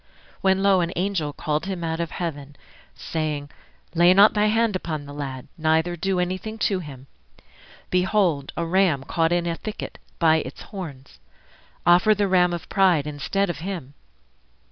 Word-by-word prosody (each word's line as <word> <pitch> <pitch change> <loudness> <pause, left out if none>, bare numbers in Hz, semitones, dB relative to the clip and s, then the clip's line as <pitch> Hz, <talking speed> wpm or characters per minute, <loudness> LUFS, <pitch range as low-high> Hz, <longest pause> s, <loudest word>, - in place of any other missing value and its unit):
When 190 0 +2
lo! 195 -2 +4
an 170 0 -1
angel 180 -5 -1
called 150 +4 -2
him 185 -3 -4
out 165 0 -2
of 170 -1 -2
heaven, 145 -5 -5 0.4
Saying, 150 -3 -3 0.4
Lay 175 +2 +5
not 200 +2 +7
thy 210 0 +2
hand 225 -1 +2
upon 155 -5 -4
the 145 - -9
lad, 135 -2 -6
Neither 160 +2 +2
do 190 +2 -1
anything 185 +5 -3
to 200 -3 +1
him. 140 -6 -10 0.9
Behold, 180 -6 +1
A 170 - -1
ram 170 -5 +2
caught 165 +3 0
in 175 0 +1
a 170 -1 -1
thicket 215 +5 -7 0.2
by 160 -2 +4
its - - -6
horns; 150 -10 -9 0.7
Offer 180 +5 +5
the 205 0 +1
Ram 180 -2 +3
of 175 -1 -5
Pride 180 -7 +3
instead 150 +7 -1
of 175 -5 -4
him. 170 -6 -6
175 Hz, 165 wpm, -24 LUFS, 150-190 Hz, 0.9 s, not